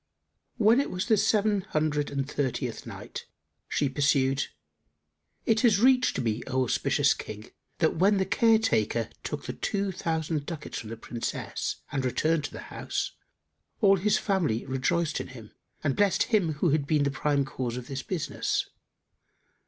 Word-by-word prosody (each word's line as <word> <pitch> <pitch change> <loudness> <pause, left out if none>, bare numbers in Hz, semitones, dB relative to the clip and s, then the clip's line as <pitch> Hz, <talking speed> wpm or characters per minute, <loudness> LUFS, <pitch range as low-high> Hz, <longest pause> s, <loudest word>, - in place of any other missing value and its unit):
When 225 +2 +5
it 280 - 0
was 180 0 -2
the 225 - +4
Seven 210 -1 +2
Hundred 150 -4 -1
and 140 -1 -2
Thirtieth 140 -3 -2
Night, - - -8 0.4
She 145 - +1
pursued, 135 -1 +2 1.0
It 225 -1 +3
hath 225 -5 +5
reached 255 - +4
me, 115 -1 -1
O 130 0 +1
auspicious 125 - +2
King, 105 0 -8 0.3
that 160 -1 +1
when 200 +4 +4
the 190 - +1
Care 225 +4 +4
taker 115 - 0
took - - -5
the - - -4
two 200 -1 -1
thousand 160 -4 -2
ducats 160 -4 -5
from 110 - -8
the 115 - -6
Princess 115 +1 -4
and 135 -1 -1
returned 150 +5 +1
to - - -5
his - - -9
house, - - -3 0.7
all 195 -3 +5
his 205 +3 +2
family 165 - 0
rejoiced 150 +5 0
in - - -7
him 115 -5 -11 0.3
and 145 -3 +1
blessed 205 -2 +3
him 190 -8 +1
who 150 +2 +1
had 145 -1 +1
been 150 -2 +3
the 140 - +1
prime 140 0 +1
cause 125 -2 -4
of 125 - -6
this 135 +1 -4
business. 180 0 -2
150 Hz, 165 wpm, -28 LUFS, 130-195 Hz, 1.0 s, When